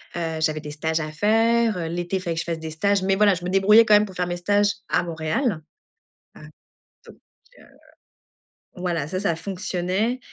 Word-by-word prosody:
heu, 165 -2 -3
j'avais 155 -1 0
des 150 -1 -8
stages 160 +2 -2
à 155 0 -4
faire. 220 0 +1
L'été, 175 +2 -3
il - - -6
fallait 170 -3 -3
que - - -2
je - - -3
fasse 165 -1 -3
des 160 0 -6
stages, 200 +4 0
mais 195 0 +2
voilà, 205 -2 +4
je 175 - -8
me - - -2
débrouillais 210 +4 +6
quand 215 - +4
même 210 0 +6
pour 190 - -12
faire 180 - -1
mes 175 0 -3
stages 205 +3 +2 0.2
à - - +1
Montréal, 165 - -2 0.8
heu, - - -14 0.7
donc, - - -14 0.4
heu, - - -17 1.1
voilà, 175 -5 -2
ça, 185 +3 -3
ça 180 -5 0
fonctionnait 185 +6 -2
180 Hz, 200 wpm, -23 LUFS, 165-205 Hz, 1.1 s, débrouillais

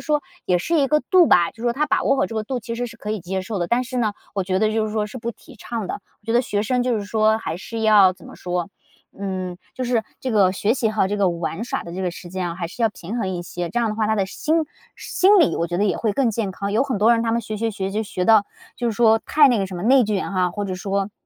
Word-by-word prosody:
说 300 -1 +1 0.2
也 180 - +3
是 330 - 0
一 275 - +3
个 300 +2 +2
度 365 -3 +7
吧， 175 - +4
就 - - -27
是 225 - -10
说 240 - +2
他 285 +5 0
把 - - +1
握 - - +3
好 - - +1
这 225 - -8
个 220 - -1
度 255 +3 -3
其 230 +1 -5
实 245 +1 -2
是 235 - -11
可 210 - -6
以 215 -2 -2
接 185 +2 -3
受 200 +2 -4
的， 175 - -1
但 240 +6 +1
是 255 +1 -6
呢， 220 -3 +1 0.2
我 195 - 0
觉 185 0 0
得 215 +1 +2
就 220 0 +1
是 215 - -5
说 215 -1 0
是 255 - -8
不 235 0 -3
提 - - -17
倡 225 -1 -5
的， - - -2 0.3
我 - - -37
觉 225 - -2
得 240 - +5
学 205 -4 -1
生 250 +3 0
就 250 -1 +1
是 205 - -4
说 215 +1 +2
还 165 -7 -4
是 225 +4 -6
要 210 -4 +6
怎 - - -15
么 - - -11
说， 180 0 -3 0.5
嗯， 185 -2 -4 0.2
就 260 - -4
是 240 -2 +1 0.2
这 260 - -3
个 200 -5 +4
学 205 +3 +1
习 230 -4 0
和 215 -3 +1
这 205 - -1
个 195 -2 +3
玩 170 +4 -3
耍 - - -3
的 170 - -8
这 190 +2 -4
个 180 - 0
时 175 0 -10
间 185 -1 -2
啊， 170 - -5
还 175 -1 -4
是 180 - -12
要 225 - +5
平 205 +2 -7
衡 220 - -1
一 180 -2 -3
些。 175 0 -5
这 240 - -1
样 230 - +1
的 - - -3
话 215 -1 0
他 220 - +2
的 195 - +2
心 310 +11 -1 0.4
心 395 +2 +3
理 330 - +4
我 170 - 0
觉 175 +1 -3
得 205 - +2
也 200 - +1
会 220 -3 0
更 255 0 +2
健 215 -2 -2
康， 200 +2 -4
有 220 - +3
很 270 -4 -2
多 220 +4 +5
人 230 - +2
他 230 - 0
们 235 - +1
学， 215 0 -5
学， 225 +1 0
学 195 -2 -3
就 215 +2 -1
学 185 -3 -3
到 220 -1 +6 0.3
就 240 - -2
是 - - -3
说 225 -1 +5
太 295 -2 +6
那 245 -3 +2
个 195 - 0
什 190 - -8
么 175 - -5
内 260 +3 +5
卷 205 -2 -2
哈， 185 -2 +1
或 205 +3 -4
者 190 -2 -3
说， 195 +1 -2
215 Hz, 340 characters per minute, -22 LUFS, 190-235 Hz, 0.5 s, 度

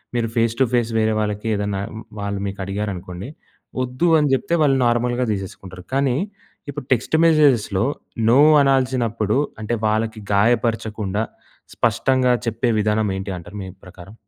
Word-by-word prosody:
మీరు 115 -1 +1
face 115 0 +1
to 130 - +5
face 120 -1 +1
వేరే 110 0 +2
వాళ్ళకి 105 +1 -2
ఏదన్నా 100 -1 -2 0.4
వాళ్ళు 100 0 -3
మీకు 100 0 -6
అడిగారనుకోండి 100 +1 -5 0.5
వద్దు 130 +7 -1
అని 145 -2 +1
చెప్తే 170 +6 0
వాళ్ళు 135 -2 +3
నార్మల్‍గా 120 +1 +1
తీసేసుకుంటారు. 95 -2 -7
కానీ 135 -2 +2 0.5
ఇప్పుడు 130 - -6
టెక్స్ట్ 125 +5 +1
మెసేజెస్‍లో 130 -10 +3 0.4
నో 125 - +5 0.2
అనాల్సినప్పుడు 125 -5 +1 0.2
అంటే 110 +2 -2
వాళ్ళకి 110 0 -1
గాయపరచకుండా 110 -1 +1 0.5
స్పష్టంగా 125 +2 +2 0.2
చెప్పే 115 +2 0
విధానం 105 0 +1
ఏంటి 95 +1 -5
అంటారు 90 +4 -10
మీ 95 - -7 0.2
ప్రకారం? 90 +1 -13
110 Hz, 135 wpm, -21 LUFS, 100-125 Hz, 0.5 s, to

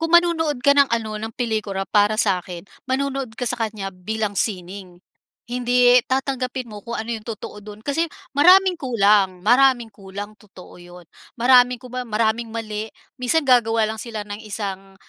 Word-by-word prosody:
Kung 330 0 -2
manonood 325 -5 +1
ka 280 - +7
ng 280 -1 +4
ano, 220 -2 -2
ng 220 +1 -5
pelikula 215 -5 -2
para 205 +3 +2
sa’kin, 180 -4 -1 0.2
manonood 265 -3 -2
ka 250 - -3
sa 245 0 -3
kaniya 210 -4 -3
bilang 215 +3 -3
sining. 185 -2 -4 0.5
Hindi 245 0 +4
tatanggapin 260 -2 -2
mo 210 - -8
kung 235 +3 -7
ano 225 0 -4
yung 225 -1 -5
totoo 215 -2 -7
dun. 210 +1 -12
Kasi 300 +5 0 0.3
maraming 365 +3 +6
kulang, 200 - +2
maraming 245 +1 +4
kulang, 200 +1 -9
totoo 195 -4 -15
‘yon. 175 0 -13 0.3
Maraming 250 +1 +5
kumbaga, 250 0 -7
maraming 225 +1 -1
mali. 215 -1 -4 0.3
Minsan 255 +6 +1
gagawa 235 -4 +3
lang 220 0 -2
sila 220 -2 -5
ng 205 0 -8
isang, 195 -2 -6
225 Hz, 160 wpm, -21 LUFS, 205-250 Hz, 0.5 s, ka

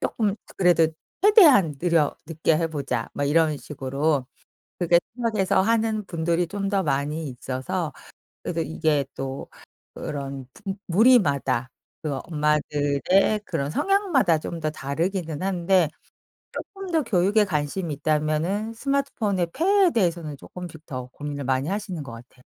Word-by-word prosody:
쪼끔 210 -4 0 0.2
그래도 175 -3 +4 0.3
'최대한 305 - +6
느려 165 -3 +2
늦게 160 0 +1
해 165 - +1
보자.' 140 -7 -3
막 145 - -1
이런 155 +1 +3
식으로 140 0 -1 0.5
그렇게 175 -1 +4 0.2
생각해서 215 -6 +1
하는 220 0 +1
분들이 170 0 0
좀 195 +3 -3
더 195 -1 +1
많이 145 +3 -1
있어서 130 +6 -3 0.5
그래서 170 -1 -2
이게 155 -2 0
또 135 0 -5 0.5
그런 140 -2 -5
부 195 -3 -5
무리마다 155 - +3 0.3
그 145 -3 -2
엄마들의 150 +5 +1
그런 145 -4 -2
성향마다 345 - +2
좀 165 +2 -6
더 155 -1 -1
다르기는 160 +2 -3
한데 185 -2 +2 0.9
쪼끔 390 -2 -7
더 320 -2 +2
교육에 205 -1 +3
관심이 155 0 -2
있다면은 155 +9 0
스마트폰의 225 -8 -1
폐해에 385 +1 +4
대해서는 170 - 0
쪼끔씩 170 0 -10
더 130 -4 -6
고민을 145 -1 -5
많이 130 +2 0
하시는 195 -4 -3
것 125 - -9
같아요. 125 +2 -14
165 Hz, 300 characters per minute, -24 LUFS, 145-200 Hz, 0.9 s, 최대한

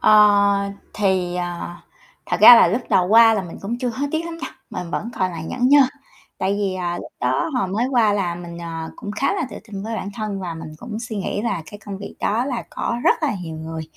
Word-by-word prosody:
Ờ, 200 -1 +5 0.2
thì, 185 -3 0
ờ, 175 -1 -4 0.5
thật - - 0
ra 245 - +12
là - - +6
lúc 220 +8 0
đầu 180 - +4
qua 225 +1 +7
là 200 - -1
mình 175 -2 -9
cũng 230 +5 -4
chưa 250 0 -1
hối 265 +5 -2
tiếc 320 +1 -1
lắm 335 0 -6
nha, 330 - -5 0.2
mình 180 -2 -5
vẫn 225 +6 -3
còn 185 -1 +1
là 170 -2 -6
nhởn 250 +9 0
nhơ. 290 +1 +7 0.6
Tại 195 - 0
vì, 200 -2 -1
à, 175 -1 -2
lúc - - -9
đó 330 - 0
hồi 190 - 0
mới 220 +6 0
qua 230 -5 +4
là 190 -4 -1
mình, 170 -1 -8
ờ, 165 -1 -6
cũng 205 - -7
khá 265 - 0
là 350 -7 -1
tự - - -8
tin 200 -2 -6
với 225 +2 -4
bản 200 - -4
thân 210 -3 -4
và 175 -3 -4
mình 160 - -8
cũng 220 +1 -6
suy 235 -2 -5
nghĩ 200 +1 -2
là 200 -8 -1
cái 205 - -9
công 200 -2 -5
việc 200 - -8
đó 225 +4 +1
là 250 -4 -2
có 235 - -2
rất - - +3
là - - +1
nhiều 160 -2 -6
người, 160 0 -6
200 Hz, 250 wpm, -21 LUFS, 180-230 Hz, 0.6 s, ra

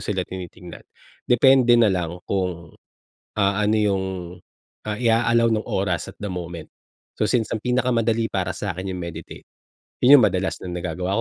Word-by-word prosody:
sila 95 -3 -2
tinitignan. 90 -1 -9 0.5
Depende 125 0 +5
na 115 -4 +4
lang 90 0 -4
kung, 90 -4 -3 0.6
ah, 100 -1 +1
ano 105 +1 +1
yung, 100 -3 +1 0.8
ah, 105 - -2
i-a-allow 115 0 +3
nung 110 -1 -1
oras 95 -2 -2
at - - -42
the 105 - -3
moment. 85 -3 -6 0.5
So, - - +1
since 115 0 0
ang 115 - -2
pinakamadali 115 -3 +1
para 90 -2 -2
sa'kin 95 -1 -4
yung 90 - -5
meditate, 85 -1 -9 0.5
'yon 135 +2 +8
yung - - +5
madalas 95 0 -2
na 95 - -7
nagagawa 90 +1 -3
100 Hz, 155 wpm, -22 LUFS, 90-115 Hz, 0.8 s, yon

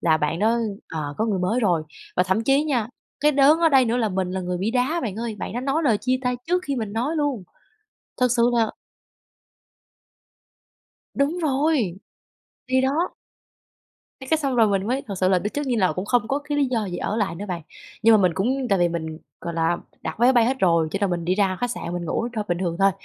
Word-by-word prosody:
là 160 -2 +3
bạn 155 +2 -1
đó, 225 +3 +2 0.3
ờ, 150 -3 -4
có 220 - +1
người 205 -4 0
mới 190 +8 0
rồi. 175 -7 +2 0.3
Và 180 - +5
thậm 190 +5 0
chí 275 +4 +3
nha, 245 -7 0 0.3
cái 300 +1 +4
đớn 285 +3 +5
ở 335 -1 +4
đây 270 -4 +5
nữa 230 +1 0
là 230 -3 +1
mình 185 -2 -2
là 190 0 -2
người 180 0 -3
bị 200 +5 -1
đá 260 +7 +1
bạn 210 -5 -3
ơi, 230 -1 -3
bạn - - -5
đó 240 - -3
nói 275 +5 0
lời 230 -9 +3
chia 255 +1 +1
tay 250 -1 0
trước 360 +2 +1
khi 280 -2 -1
mình 215 -3 -3
nói 255 +9 -1
luôn. 285 -9 -1 0.8
Thật 250 - +3
sự 235 -1 +3
là 225 -2 +2 2.4
Đúng 285 +5 0
rồi, 300 +1 +2 0.9
thì 260 0 +2
đó. 290 +7 0 1.1
Cái 265 - -9
cái 320 - +4
xong 275 -4 -1
rồi 225 -2 +5
mình 195 -1 0
mới 260 +4 -1
thực 195 -2 -4
sự 185 - +2
là 185 -1 +4
biết 205 +4 -3
trước 290 0 -2
như 245 -3 0
là 185 -4 +2
cũng 185 - -4
không 240 -2 +1
có 275 - +1
cái 290 0 -3
lý 285 - +4
do 235 -4 -1
gì 175 - -4
ở 210 - -2
lại 205 -6 0
nữa 200 +4 -6
bạn, 170 -3 -4 0.4
nhưng 225 0 +7
mà - - +6
mình 180 -3 +2
cũng 255 +7 0
tại 195 - +2
vì 175 0 +3
mình, 160 -2 -4 0.2
gọi 170 -1 -5
là, 165 +1 +1 0.3
đặt - - -5
vé 240 - +4
máy 260 - +6
bay 240 -3 +4
hết 260 +3 0
rồi 170 -6 +3
cho 195 - -2
nên 200 -2 +1
mình 175 -1 -2
đi 180 +2 +1
ra 190 -2 +1
khách 245 -1 0
sạn 170 - -5
mình 175 -1 -3
ngủ 230 +8 -1
thôi, 215 - -2
bình 175 - 0
thường 175 -2 -2
thôi. 195 0 +5
225 Hz, 245 wpm, -23 LUFS, 185-265 Hz, 2.4 s, nhưng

